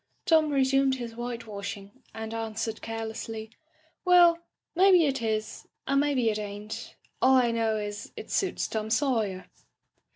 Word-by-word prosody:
" - - -45
Tom 315 -2 +4
resumed 270 -1 +3
his 240 -3 -6
whitewashing 225 -2 -6
and 220 0 -6
an^ 225 -1 -4
swered 225 0 -3
carelessly: 225 0 -5 0.5
"'Welly 350 -2 +6 0.3
maybe 365 -2 +6
it 270 -3 -1
is, 215 -1 -3 0.2
and 275 +1 +2
maybe 270 -6 +2
it 215 - -3
ain't; 210 +1 -7 0.3
all 265 +1 +6
I 245 -2 +4
know 225 -1 0
is 205 0 -5
it - - -8
suits 385 -3 0
Tom 220 -1 -3
Sawyer.'" 220 -7 0
230 Hz, 150 wpm, -28 LUFS, 220-270 Hz, 0.5 s, Welly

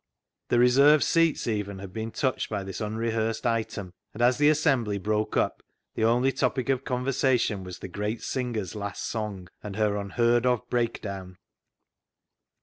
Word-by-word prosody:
The - - +3
reserved 140 +5 +6
seats 165 -2 +2
even 105 -3 -2
had 95 -1 -9
been 110 +1 -3
touched 130 +3 -1
by 100 -2 -2
this 95 +2 -6
unrehearsed 110 +2 -1
item, 110 -5 -2 0.2
and 115 - -5
as 125 +2 +4
the 150 0 +6
assembly 135 -9 +2
broke 105 +2 -1
up - - 0 0.3
the 110 - 0
only 120 +4 +3
topic 130 -1 -1
of 135 -1 +1
conversation 125 -5 0
was 90 -1 -7
the - - -7
great 105 +4 -3
singer's 120 -8 -3
last 100 -1 -5
song, 105 -5 -4
and 100 -2 -7
her 105 -1 +1
unheard 120 +4 +2
of 125 -2 +1
breakdown. 100 -6 -2
115 Hz, 155 wpm, -27 LUFS, 100-125 Hz, 0.3 s, reserved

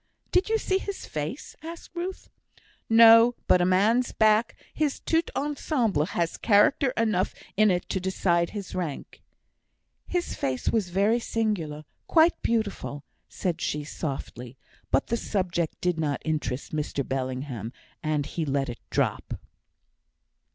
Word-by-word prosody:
"Did 365 +3 +2
you 445 - +3
see 380 -3 0
his 400 0 -6
face, 155 - -5
sir?" 320 - -7
asked 340 - -14
Ruth. 360 +2 -5 0.6
"No; 230 +1 +8
but 180 - +4
a 175 - +3
man's 215 +7 +3
back 220 +1 +3 0.2
his 300 -3 -1
tout 325 0 0
ensemble 265 - 0
has 170 0 -2
character 245 +6 +4
enough 215 -5 +1 0.2
in 215 +1 +5
it 180 -2 0
to 190 - -1
decide 175 -2 +1
his 200 -3 -7
rank." 170 -6 -5 0.9
"His 355 -1 -2
face 130 -1 -1
was 215 -6 0
very 200 +6 +2
singular; 185 -11 -2 0.2
quite 330 +1 +4
beautiful!" 205 -10 -2 0.3
said 175 -3 -3
she, 150 0 -1
softly; 135 -4 -6 0.3
but 135 - +2
the 235 - -1
subject 180 -7 -2
did 180 -2 0
not 145 -3 0
interest 155 -3 -2
Mr 145 -2 -2
Bellingham, 130 -3 -3 0.3
and 155 -2 0
he 165 - -3
let 140 -2 -1
it 120 - -6
drop. - - -1
185 Hz, 140 wpm, -26 LUFS, 150-230 Hz, 0.9 s, No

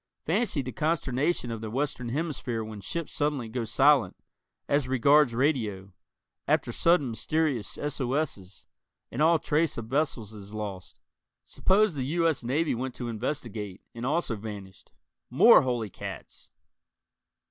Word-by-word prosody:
Fancy 185 - +1
the 130 - -5
consternation 145 -1 0
of 115 -1 -5
the 110 - -5
Western 130 0 -2
Hemisphere 130 -5 -2
when 110 -2 -8
ships 160 - -4
suddenly 145 -5 -1
go 115 +1 -3
silent, 135 -2 +4 0.5
as 140 -2 +1
regards 130 0 +4
radio, 110 - 0 0.5
after - - +1
sudden 165 -7 +2
mysterious 145 -1 -1
SOS's 135 - -3 0.5
and 130 - -3
all 165 +2 +5
trace 155 0 0
of 115 - -4
vessels 120 -4 -1
is 105 0 -10
lost. 100 -4 -6 0.5
Suppose 200 0 +2
the 135 -3 -3
U. 165 +4 +1
S. 155 -6 0
Navy 150 +7 0
went 125 +1 -4
to 120 -1 -5
investigate, 110 -4 -4
and 115 - -7
also 145 -2 0
vanished. 100 -3 -9 0.4
More - - +7
holy 120 -5 -2
cats! - - -9
130 Hz, 135 wpm, -28 LUFS, 110-150 Hz, 0.5 s, More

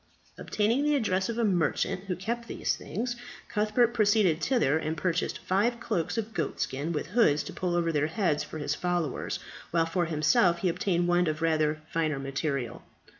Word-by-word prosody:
Obtaining 225 +6 +1
the 295 0 +3
address 190 -7 0
of 230 - -3
a 235 - +1
merchant 185 -1 +1
who 185 -2 -2
kept 235 +6 -4
these - - -1
things, 240 +3 -4 0.3
Cuthbert 215 +2 +2
proceeded 205 -7 +3
thither; 160 - +2
and 160 0 -3
purchased 180 +1 -1
five 220 +6 0
cloaks 200 -4 -2
of 225 0 -3
goat 165 -4 -2
skin 145 +5 -2
with 150 - -2
hoods 155 -12 +3
to - - -8
pull 180 -2 -1
over 170 -1 +1
their 150 -1 +1
heads 165 -3 0
for - - -8
his 145 -1 -1
followers, 175 -3 -2 0.3
while 165 -1 +2
for 175 +2 0
himself 170 +4 +3
he 185 - +2
obtained 175 0 0
one 175 0 +3
of 155 +1 -2
rather 155 -1 +1
finer 155 -3 0
material. 135 -2 -3
175 Hz, 180 wpm, -28 LUFS, 155-215 Hz, 0.3 s, the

